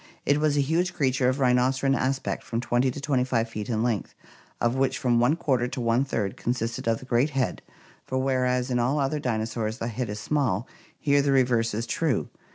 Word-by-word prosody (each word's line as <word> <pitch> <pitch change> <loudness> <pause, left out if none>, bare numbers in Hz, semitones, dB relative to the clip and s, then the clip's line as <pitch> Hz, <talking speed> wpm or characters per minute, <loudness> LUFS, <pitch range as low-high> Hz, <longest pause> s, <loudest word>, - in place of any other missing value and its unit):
It 145 +1 +3
was 150 -1 +2
a - - +4
huge 170 +5 0
creature 130 -5 +2
of 130 - -1
rhinocerine 130 +1 +2
aspect, 135 +1 -1
from 115 - -3
20 120 +1 +1
to 130 - -5
25 130 -4 0
feet 110 +1 -6
in 110 -1 0
length, 115 -5 -2 0.4
of 120 0 +1
which 135 0 +1
from 120 -2 +2
one 125 +6 +3
quarter 130 -7 0
to 125 - -5
one 120 +2 +2
third 105 -7 -2
consisted 115 -1 -3
of 115 -1 +2
the 130 - -12
great 125 +3 +2
head, 130 - 0 0.5
for 130 - -2
whereas 130 -1 +1
in 125 - +1
all 125 +5 +1
other 140 +2 0
dinosaurs 110 -3 -2
the 115 -1 -3
head 120 0 -3
is 105 0 -4
small, 125 -4 0 0.3
here 145 -1 +3
the 140 0 +1
reverse 120 -4 +2
is 115 +2 -2
true. 150 +3 -1
125 Hz, 205 wpm, -26 LUFS, 115-135 Hz, 0.5 s, a